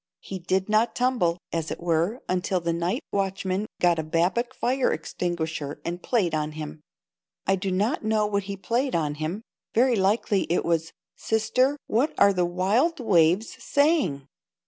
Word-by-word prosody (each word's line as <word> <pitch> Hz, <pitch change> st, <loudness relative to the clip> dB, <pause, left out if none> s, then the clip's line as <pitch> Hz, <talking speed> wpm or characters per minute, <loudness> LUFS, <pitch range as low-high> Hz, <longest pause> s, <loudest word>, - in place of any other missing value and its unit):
He 190 Hz, -, -6 dB
did 185 Hz, +2 st, 0 dB
not 215 Hz, +3 st, +2 dB
tumble, 245 Hz, -10 st, +1 dB, 0.2 s
as 165 Hz, -1 st, -2 dB
it -, -, -5 dB
were, 175 Hz, +8 st, 0 dB
until 185 Hz, 0 st, 0 dB
the 170 Hz, -1 st, -1 dB
night 170 Hz, +2 st, -1 dB
watchman 195 Hz, 0 st, -1 dB
got 175 Hz, -2 st, +3 dB
a -, -, -1 dB
Babcock 180 Hz, +11 st, 0 dB
fire 255 Hz, +1 st, +1 dB
extinguisher 160 Hz, -3 st, -3 dB
and 175 Hz, +1 st, -3 dB
played 200 Hz, -9 st, +1 dB
on 155 Hz, 0 st, -1 dB
him. 155 Hz, 0 st, -7 dB, 0.6 s
I 195 Hz, -, +3 dB
do 195 Hz, +1 st, -3 dB
not 210 Hz, +9 st, 0 dB
know 215 Hz, -1 st, +2 dB
what 200 Hz, -1 st, -1 dB
he 200 Hz, 0 st, -5 dB
played 245 Hz, +7 st, -1 dB
on 150 Hz, -3 st, 0 dB
him. 175 Hz, +8 st, -3 dB, 0.3 s
Very 245 Hz, +2 st, +4 dB
likely 200 Hz, 0 st, +1 dB
it 175 Hz, -, +1 dB
was, 165 Hz, -1 st, 0 dB, 0.2 s
"Sister, 255 Hz, +6 st, +1 dB
what 255 Hz, +8 st, +1 dB
are 200 Hz, -, +6 dB
the 180 Hz, -1 st, +1 dB
wild 205 Hz, -, +1 dB
waves 185 Hz, -2 st, +3 dB
saying?" 285 Hz, -, +2 dB
190 Hz, 165 wpm, -25 LUFS, 170-225 Hz, 0.6 s, are